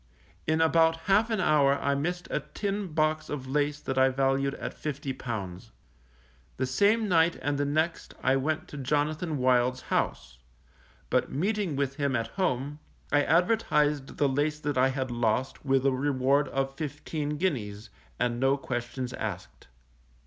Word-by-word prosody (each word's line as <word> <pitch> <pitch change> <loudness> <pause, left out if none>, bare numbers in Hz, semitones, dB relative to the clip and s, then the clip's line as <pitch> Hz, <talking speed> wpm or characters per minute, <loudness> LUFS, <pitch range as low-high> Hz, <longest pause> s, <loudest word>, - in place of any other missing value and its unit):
In 160 +1 +2
about 160 0 +4
half 205 +3 +3
an 220 -3 0
hour 145 -5 +4
I 140 - +1
missed 175 +5 -2
a - - +1 0.2
tin 200 -1 -2
box 155 -1 0
of 140 -3 -4
lace 145 +2 0
that 135 -2 -2
I 130 0 +5
valued 135 +1 +1
at - - -6
£50. 125 - -5 0.9
The - - 0
same 205 - +2
night 170 -2 +4
and 145 -1 -1
the 145 - +1
next 155 +4 -1
I 130 +1 +4
went 150 +3 -1
to 150 - -8
Jonathan 150 +3 -1
Wild's 125 0 +2
house; 65 -1 -1 0.7
but - - +1
meeting 195 +1 -1
with 135 -1 -1
him 140 -3 0
at 115 -1 -1
home, 145 -5 -1 0.3
I 145 - +4
advertised 150 -5 +2
the 145 - +3
lace 145 +3 0
that 145 0 -1
I 130 +1 +4
had 130 -1 -2
lost 120 +2 -1
with 135 -1 +2
a 135 - +5
reward 135 +1 +2
of 135 +1 -2
fifteen 150 +1 -4
guineas, 110 - -2 0.3
and 120 -1 0
no 135 +2 +3
questions 125 -1 -4
asked. 95 -6 -6
140 Hz, 155 wpm, -28 LUFS, 130-155 Hz, 0.9 s, I